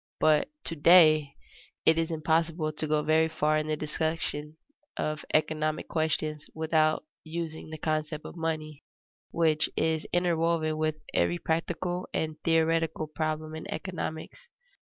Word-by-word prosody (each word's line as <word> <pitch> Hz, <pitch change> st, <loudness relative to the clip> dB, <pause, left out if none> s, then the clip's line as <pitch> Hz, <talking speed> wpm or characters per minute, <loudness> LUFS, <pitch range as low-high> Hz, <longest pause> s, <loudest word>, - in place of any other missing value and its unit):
But 155 Hz, -1 st, +4 dB
to 165 Hz, -, -3 dB
day 155 Hz, -3 st, +6 dB, 0.5 s
it 160 Hz, 0 st, +5 dB
is 165 Hz, 0 st, 0 dB
impossible 160 Hz, 0 st, 0 dB
to 155 Hz, +1 st, -3 dB
go 150 Hz, 0 st, +1 dB
very 160 Hz, +1 st, +3 dB
far 155 Hz, 0 st, +1 dB
in 155 Hz, -, -3 dB
the 155 Hz, 0 st, -1 dB
discussion 155 Hz, 0 st, -3 dB, 0.4 s
of 155 Hz, 0 st, -2 dB
economic 155 Hz, 0 st, 0 dB
questions 155 Hz, -1 st, -1 dB
without 155 Hz, -1 st, +2 dB, 0.2 s
using 160 Hz, -1 st, -5 dB
the 155 Hz, -, -6 dB
concept 155 Hz, 0 st, -2 dB
of -, -, -8 dB
money, 155 Hz, -3 st, -3 dB, 0.5 s
which 160 Hz, -2 st, +2 dB
is 160 Hz, -1 st, 0 dB
interwoven 165 Hz, -3 st, +1 dB
with 155 Hz, -1 st, +1 dB, 0.2 s
every 175 Hz, -, +2 dB
practical 175 Hz, +2 st, -2 dB
and 155 Hz, -1 st, -1 dB
theoretical 165 Hz, -1 st, +2 dB
problem 155 Hz, 0 st, -3 dB
in 160 Hz, -, -7 dB
economics. 175 Hz, -, -5 dB
155 Hz, 130 wpm, -28 LUFS, 155-165 Hz, 0.5 s, day